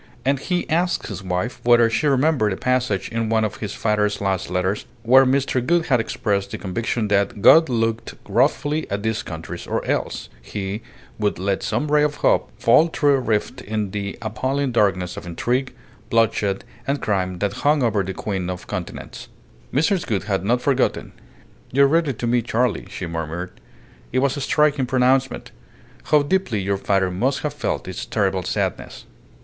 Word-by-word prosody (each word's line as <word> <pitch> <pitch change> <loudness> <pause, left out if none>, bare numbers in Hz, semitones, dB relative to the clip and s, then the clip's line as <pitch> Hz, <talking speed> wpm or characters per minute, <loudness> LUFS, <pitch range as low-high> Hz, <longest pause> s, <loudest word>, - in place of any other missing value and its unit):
And 135 0 +2
he 180 +5 -2
asked 175 +3 0
his 100 -2 -6
wife 90 +6 -3
whether 120 -1 +5
she 115 +6 0
remembered 135 -5 +2
a - - -5
passage 125 -6 0
in 115 -1 -2
one 110 -1 +2
of 110 - -2
his 105 -2 -5
father's 105 -1 0
last 95 -3 -1
letters 90 +3 -1 0.2
where 130 +3 +6
Mr. 130 -1 +1
Gould 170 +4 +2
had 125 -4 +2
expressed 100 -3 -1
the - - -5
conviction 110 +3 -2
that 100 0 0
"God 160 -1 +7
looked 115 -1 -1
wrathfully 150 +2 +1
at 100 +1 -3
these 110 -1 -1
countries, 80 -1 -7
or - - -2
else - - -2
He 100 - -5 0.4
would 105 -1 0
let 95 +1 -1
some 150 0 -1
ray 150 0 +5
of 150 0 +1
hope - - +3
fall 160 - +5
through 145 -3 +2
a 135 - +3
rift 120 +1 -1
in 105 -3 -3
the 100 -1 -4
appalling 130 +6 -1
darkness 95 -6 +1
of - - -7
intrigue, 125 +10 -1 0.4
bloodshed, 110 -4 +1 0.2
and 140 +1 0
crime 95 -3 -1
that 100 +2 -1
hung 145 -1 +3
over 110 -4 +2
the 95 0 -4
Queen 95 -4 -3
of 90 -1 -5
Continents." - - -6 0.4
Mrs. 170 +6 +1
Gould 105 -6 -1
had 100 -2 -1
not 120 +5 +1
forgotten. 135 -3 0 0.6
"You 140 +2 +5
read 165 +3 +2
it 135 -5 -2
to - - -3
me, 120 +1 +2
Charley," 115 -2 -1
she - - -5
murmured. 85 +2 -4 0.6
"It 130 - -1
was 140 +1 +2
a 140 - -4
striking 145 -1 +2
pronouncement. 130 0 +1 0.5
How 150 -1 +4
deeply 145 - 0
your 100 0 -1
father 95 -1 +1
must 130 +9 0
have 150 -1 -2
felt 145 - -3
its 95 0 -5
terrible 95 -3 0
sadness!" - - -3
115 Hz, 180 wpm, -22 LUFS, 100-135 Hz, 0.6 s, God